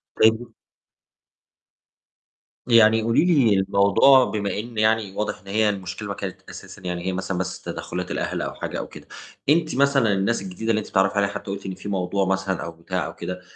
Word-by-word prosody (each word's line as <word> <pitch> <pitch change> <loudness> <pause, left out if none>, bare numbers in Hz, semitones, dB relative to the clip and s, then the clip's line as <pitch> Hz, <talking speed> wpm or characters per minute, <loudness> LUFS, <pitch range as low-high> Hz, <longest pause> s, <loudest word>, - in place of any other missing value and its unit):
طيب 110 +1 +4
و 120 -1 -11 2.2
يعني 115 -1 +6
قولي 115 +8 +2
لي 140 - +4
الموضوع 100 +7 +5
بما 100 -2 -2
إن 115 +1 -8
يعني 110 -2 +2
واضح 105 - -2
إن 100 - -22
هي 105 +2 +2
المشكلة 100 +1 -5
ما 100 - -3
كانت 100 -2 -6
أساسًا - - -11
يعني 90 -1 -4
هي 95 - -1
مثلًا 95 0 -3
بس 90 -1 -4
تدخُّلات - - -5
الأهل - - -2
أو - - -4
حاجة - - -5
أو - - -5
كده. - - -13 0.4
أنتِ 155 0 +2
مثلًا 135 -5 +3
الناس 100 +4 0
الجديدة 95 +4 -5
اللي 110 -1 +3
أنتِ 105 - -7
بتتعرّفي 95 +1 +2
عليها 100 0 +2
حتى 100 - -6
قُلتِ 100 0 -6
إن 95 - -4
في 95 +2 -8
موضوع 95 0 0
مثلًا 95 0 -1
أو 85 - -5
بتاع 85 +3 -4
أو - - -7
كده، 90 +1 -6
100 Hz, 195 wpm, -23 LUFS, 95-110 Hz, 2.2 s, يعني